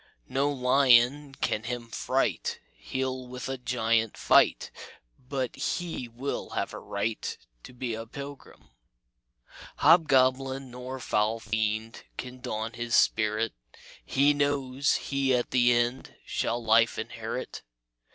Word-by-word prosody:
No 140 +2 +1
lion 135 +1 +4
can 105 - -1
him 120 -1 -4
fright; - - -1 0.2
He'll 130 -1 -4
with 125 0 -6
a 135 -1 -4
giant 115 -3 0
fight, - - +3 0.6
But 130 -3 -2
he 170 -8 -3
will 120 +4 -4
have - - -2
a - - -6
right 105 +2 -3 0.2
To - - -12
be 125 -1 -4
a 115 +1 -6
pilgrim. 140 +3 -10 1.1
"Hobgoblin 135 -4 +3
nor 125 +1 -7
foul 110 -1 0
fiend 110 +1 -2
Can 125 0 -7
daunt 115 -2 -4
his 120 0 -1
spirit; 110 0 +2 0.5
He 140 +2 +3
knows 140 -1 +1
he 135 -2 0
at 120 - -1
the 125 -1 +4
end 120 +2 0
Shall 120 +1 -2
life 115 +1 +4
inherit. - - -5
125 Hz, 120 wpm, -28 LUFS, 115-135 Hz, 1.1 s, lion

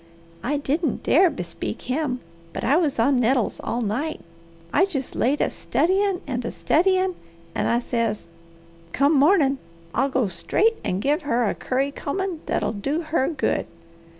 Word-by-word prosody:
I 290 +4 0
didn't 290 +1 -1
dare 355 +5 +5
bespeak 180 - -5
him, 255 -1 -1 0.3
but - - -4
I 275 - +3
was 315 -5 +1
on 250 +3 +3
nettles 245 -1 +1
all 240 +1 -1
night. 260 +10 -2 0.5
I 375 - +5
jest 275 -10 -4
laid 270 +5 +1
a - - +1
studyin' 385 +1 +1
and 250 -3 -3
a - - -2
studyin', 370 +2 +2 0.4
and - - 0
I 235 - +3
says, 230 -3 -1 0.7
'Come 280 +3 +3
mornin' 285 -2 +4 0.3
I'll 270 - +2
go 255 -4 +1
straight 425 - +1
and 185 +2 -1
give 295 +5 +2
her 245 -6 +1
a - - +1
curry 270 +2 -1
combin' 365 +4 -3
that'll - - 0
do 275 +10 -2
her 265 - +3
good.' 305 -5 -1
280 Hz, 160 wpm, -24 LUFS, 245-330 Hz, 0.7 s, dare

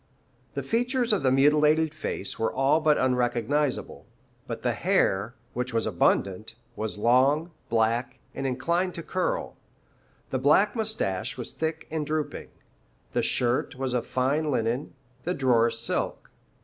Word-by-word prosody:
The - - -2
features 245 0 +1
of 205 - +1
the 130 -1 +3
mutilated 150 +3 +4
face 155 -9 -4
were 115 - +1
all 135 +4 +3
but 155 -1 +3
unrecognizable, 125 +3 0 0.4
but - - -5
the - - +1
hair, 100 +6 +1 0.2
which 125 0 -3
was 115 - +1
abundant, 100 +1 0 0.2
was 110 -1 -3
long, 135 +9 +3 0.2
black, 115 +2 +1 0.2
and 135 - -3
inclined 170 +8 0
to 170 - -5
curl; 185 +2 -2 0.7
the 130 - 0
black 150 - +4
moustache 215 - -2
was 125 - -5
thick 160 0 -3
and 160 -1 -1
drooping. 155 0 -3 0.6
The - - +2
shirt 120 +1 0
was 130 -1 -2
of 125 - -1
fine 140 +5 0
linen, 125 +2 -1 0.3
the 180 +2 -1
drawers 120 -3 +3
silk. 115 - -2
135 Hz, 140 wpm, -27 LUFS, 120-155 Hz, 0.7 s, mutilated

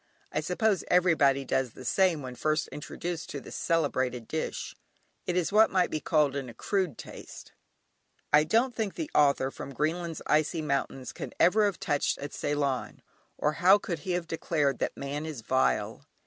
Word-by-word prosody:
I - - 0
suppose 220 -5 +1
everybody 155 -7 +3
does 130 -3 0
the 130 - -11
same 175 0 +2
when 130 -1 -6
first 155 +3 0
introduced 170 +3 -5
to 145 - -5
this - - -10
celebrated 130 -7 0
dish: 160 - -4 0.5
it 180 - 0
is 180 0 0
what 215 +2 +6
might 185 -2 +1
be 155 - -1
called 150 -3 +2
"an 135 -3 -4
accrued 175 - -2
taste." - - -10 0.8
I 150 +1 +7
don't 230 +10 +2
think 215 -4 -2
the 315 -1 -4
author 140 -2 +3
of - - -16
"From 140 - -8
Greenland's 165 +3 -2
Icy 155 +2 +1
Mountains" 140 -2 -2
can - - -7
ever 210 +4 +5
have 200 -3 -1
touched 145 -1 0
at 145 +1 -7
Ceylon, 145 -3 -2 0.3
or 150 - +1
how 190 +3 +7
could 175 -5 -4
he 180 +5 -3
have 175 -1 -1
declared 155 -5 0
that - - -2
"man 140 +2 -4
is 155 -6 -6
vile"? 130 +4 0
155 Hz, 175 wpm, -29 LUFS, 140-180 Hz, 0.8 s, I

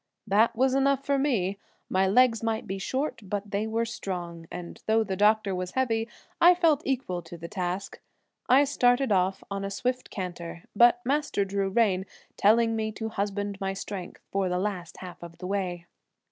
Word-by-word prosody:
That 215 +3 +3
was 260 +2 +3
enough 275 0 +2
for 280 -1 +2
me; 200 -9 0 0.3
my 190 +1 +2
legs 230 +3 +4
might 225 -1 -1
be 195 +1 -4
short 265 +9 -2
but 205 0 -4
they 205 +2 -1
were 225 +1 0
strong, 175 -7 -5
and 175 -1 -8
though 220 +1 +4
the 190 -3 -3
doctor 210 0 +3
was 180 0 -4
heavy 230 -4 0 0.3
I 355 +1 +8
felt 325 -5 +3
equal 250 -10 -1
to 170 +1 -10
the 170 0 -7
task. 185 +1 -4 0.5
I 265 +3 +7
started 255 -2 +2
off 190 0 +1
on 200 0 -3
a 195 - -2
swift 250 +5 -2
canter 175 -3 -6
but 240 +2 +6
Master 280 -7 +1
drew 195 0 -1
rein, 190 -3 +2 0.3
telling 225 +2 +4
me 220 0 -1
to 220 +1 -4
husband 205 -1 -3
my 195 0 -1
strength 190 -2 -7
for 195 -1 0
the 180 - 0
last 185 -3 -3
half 180 -2 -9
of 170 -1 -10
the 180 - -8
way. 180 -3 -2
205 Hz, 185 wpm, -27 LUFS, 185-235 Hz, 0.5 s, I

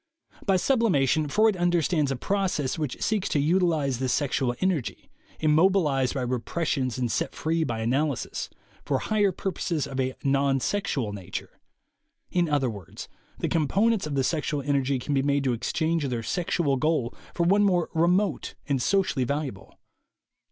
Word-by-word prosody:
By 195 - +4
sublimation, 165 - +2
Freud 215 +6 +3
understands 175 -4 +1
a 135 - -1
process* 175 -3 -1
which 150 -5 -3
seeks 210 -3 0
to 150 - +1
utilize 155 -5 +1
the 130 -1 -1
sexual 130 -3 0
energy, 180 -9 -2 0.3
immobilized 155 -4 +3
by 130 - -1
repressions 130 +1 -1
and 125 -3 -1
set - - -2
free 160 +1 0
by 115 -6 -3
analysis, 130 +2 -1 0.3
for 135 - 0
higher 205 +6 +1
purposes 170 -4 -2
of 135 - -5
a 130 0 -1
non 135 0 +2
sexual 135 - -1
nature. 95 -3 -7 0.7
In 175 -2 +1
other 145 -3 +2
words, 100 -8 -8 0.3
the - - -1
components 195 +5 +1
of 145 - -3
the 135 - +2
sexual 150 -1 -1
energy 140 -1 +1
can 135 +4 -3
be 135 - +3
made 140 0 +1
to 130 -2 +1
exchange 160 +6 -1
their 120 -3 -3
sexual 165 - 0
goal 155 -4 0 0.2
for 170 - +1
one 195 +4 +4
more 180 -4 +2
remote 180 +5 +1
and 140 -4 0
socially 185 -6 +1
valu 145 +3 -1
able. 95 -7 -10
145 Hz, 160 wpm, -26 LUFS, 130-175 Hz, 0.7 s, By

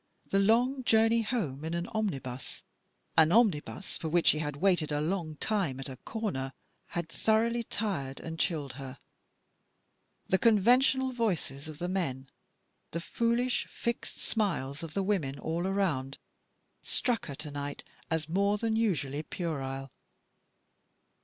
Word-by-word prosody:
The 195 - +4
long 245 +6 +3
journey 225 0 +4
home 180 - -2
in 165 +1 -2
an 170 0 -1
omnibus, 140 - -3 0.5
an 160 0 +6
omnibus 195 -4 +2
for 160 - -3
which 170 +1 +2
she 155 - +6
had 150 -2 -2
waited 170 -2 +2
a 145 - +1
long 160 0 -1
time 175 -7 0
at 135 - -5
a 130 - -7
corner, 135 - -3 0.3
had 170 -1 -3
thoroughly 230 +2 +2
tired 180 -13 -2
and 165 0 -6
chilled 150 -6 0
her. 135 0 -7 1.3
The 190 - +3
conventional 250 +4 +4
voices 175 - -1
of 155 -2 -7
the 175 +2 -2
men, 135 -8 -2 0.6
the 170 - -3
foolish, 235 +6 +1
fixed 235 0 -3
smiles 155 - -1
of 165 -1 -6
the 195 - +1
women 170 -9 0
all 170 +5 -2
around 160 -9 0 0.6
struck 245 -3 0
her 140 - -5
to 150 +1 -6
night 145 0 -5 0.3
as 160 -2 0
more 200 +5 +2
than 225 +1 0
usually 150 - +1
puerile. 135 -6 -4
175 Hz, 140 wpm, -30 LUFS, 145-220 Hz, 1.3 s, an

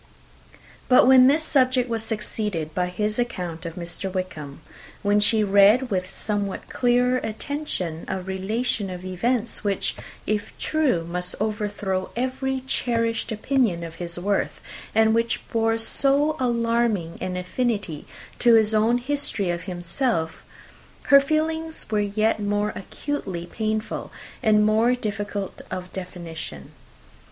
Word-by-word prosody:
But 250 - +7
when 255 0 +8
this 300 +4 +3
subject 255 -4 +2
was 230 -2 -2
succeeded 210 -7 -3
by 180 +1 0
his 210 +5 -2
account 180 -9 -3
of 165 - -7
Mr. 175 +2 -4
Wickham 160 -6 -5 0.4
when 205 0 +3
she 215 +1 +3
read, 205 +5 +5
with 185 -1 -1
somewhat 205 -2 -3
clearer 250 +1 +2
attention, 220 - -4
a 190 - -2
relation 195 +3 -1
of 180 0 -7
events 230 +6 0
which, 200 -2 0 0.3
if 210 0 -2
true, 295 - +1
must 180 +1 -1
overthrow 205 -3 -2
every 260 +2 -1
cherished 230 -3 0
opinion 220 -5 +1
of 165 -1 -6
his 170 0 -4
worth, 200 +3 -1 0.4
and 220 0 +5
which 230 +1 0
bore 225 0 +1
so 280 +6 +3
alarming 230 -7 0
an 180 0 -3
affinity 195 - -2 0.3
to 235 -1 +6
his 220 -1 +4
own 220 +3 +3
history 245 -8 -1
of 170 0 -4
himself 175 -1 -2 0.7
her 280 - +11
feelings 320 +2 -1
were 210 - +2
yet 215 +2 +1
more 205 0 0
acutely 195 -6 -4
painful 215 +3 -3 0.3
and 210 -1 +4
more 225 +3 +3
difficult 205 -3 -4
of 180 0 -6
definition. 165 - -7
215 Hz, 130 wpm, -24 LUFS, 185-245 Hz, 0.7 s, her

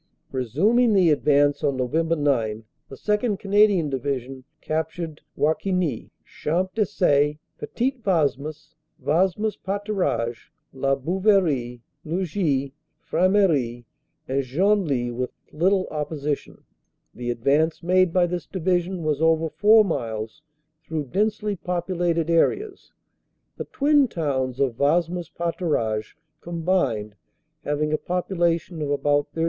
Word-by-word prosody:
"Resuming 200 - +2
the 185 -5 +5
advance 145 -1 +3
on 140 -3 +1
Nov. 125 -1 -2
9, 145 -10 +1 0.3
the 135 - -9
2nd. 210 - 0
Canadian 200 -4 +3
Division 135 -1 -3 0.2
captured 160 0 -4 0.2
Warquignies, 160 - 0 0.2
Champ 180 +4 -2
des 215 -2 +2
Sait, 150 -4 +2 0.2
Petit 250 +3 -1
Wasmes, 155 -3 -1 0.3
Wasmes 190 +6 +1
Paturages, 190 - -2 0.2
La 135 +1 +1
Bouverie, 155 - +1 0.2
Lugies, 160 -5 -1 0.3
Frameries, 165 - +1 0.4
and 135 +1 0
Genly 145 -4 +1
with 125 +1 -2 0.2
little 185 +4 +2
opposition. 150 -1 -4 0.5
The 120 0 -5
advance 140 +8 +1
made 185 0 +3
by 180 0 +3
this 175 0 -4
Division 180 -1 -1
was 155 -1 -1
over 160 -1 +2
four 215 +1 +5
miles 115 - -4 0.4
through 155 -4 -4
densely 210 - 0
populated 175 -2 -1
areas, 380 - 0 0.6
the - - -5
twin 285 -1 +3
towns 135 - -2
of 130 -4 0
Wasmes 170 +3 +1
Paturages 155 - -2 0.3
combined 165 - -1 0.5
having 150 +1 -1
a 155 - +1
population 175 -2 -1
of 145 - -2
about 145 0 +1
30,000. - - -6
160 Hz, 110 wpm, -24 LUFS, 140-185 Hz, 0.6 s, the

